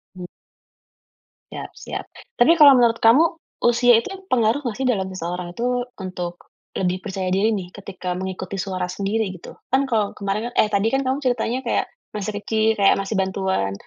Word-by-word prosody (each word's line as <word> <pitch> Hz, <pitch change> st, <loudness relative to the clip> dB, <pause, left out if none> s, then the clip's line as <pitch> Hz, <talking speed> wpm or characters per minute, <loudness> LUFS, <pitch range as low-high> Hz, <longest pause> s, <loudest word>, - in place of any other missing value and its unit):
Mmm. 180 Hz, -1 st, -7 dB, 1.3 s
Siap -, -, -7 dB
siap. -, -, -6 dB, 0.3 s
Tapi 325 Hz, +8 st, +6 dB
kalau 290 Hz, -3 st, +9 dB
menurut 235 Hz, -3 st, +4 dB
kamu, 230 Hz, +8 st, +6 dB, 0.5 s
usia 245 Hz, +1 st, +5 dB
itu -, -, -8 dB, 0.2 s
pengaruh 235 Hz, +3 st, +2 dB
gak 230 Hz, -4 st, -3 dB
sih 265 Hz, -, -2 dB
dalam 195 Hz, -6 st, +1 dB
seseorang 175 Hz, -1 st, -5 dB
itu, 245 Hz, +3 st, -1 dB, 0.2 s
untuk 180 Hz, -2 st, -6 dB, 0.3 s
lebih 185 Hz, 0 st, 0 dB
percaya 190 Hz, -2 st, -3 dB
diri 195 Hz, +4 st, +2 dB
nih 185 Hz, -3 st, -5 dB
ketika 190 Hz, -2 st, -6 dB
mengikuti 190 Hz, +1 st, -5 dB
suara 185 Hz, -1 st, -2 dB
sendiri, 200 Hz, +3 st, -1 dB
gitu? -, -, -11 dB, 0.2 s
Kan 265 Hz, +2 st, +3 dB
kalau 215 Hz, -4 st, +1 dB
kemaren 210 Hz, +4 st, -2 dB
eh -, -, +5 dB
tadi 200 Hz, +2 st, +2 dB
kan 270 Hz, -, +2 dB
kamu 260 Hz, +1 st, +1 dB
ceritanya 245 Hz, -1 st, 0 dB
kayak, -, -, +1 dB, 0.3 s
masih 210 Hz, 0 st, -3 dB
kecil, 220 Hz, +1 st, +1 dB
kayak 195 Hz, -, +5 dB
masih 195 Hz, +2 st, -3 dB
bantuan. 190 Hz, -, -1 dB
205 Hz, 170 wpm, -22 LUFS, 185-240 Hz, 1.3 s, kalau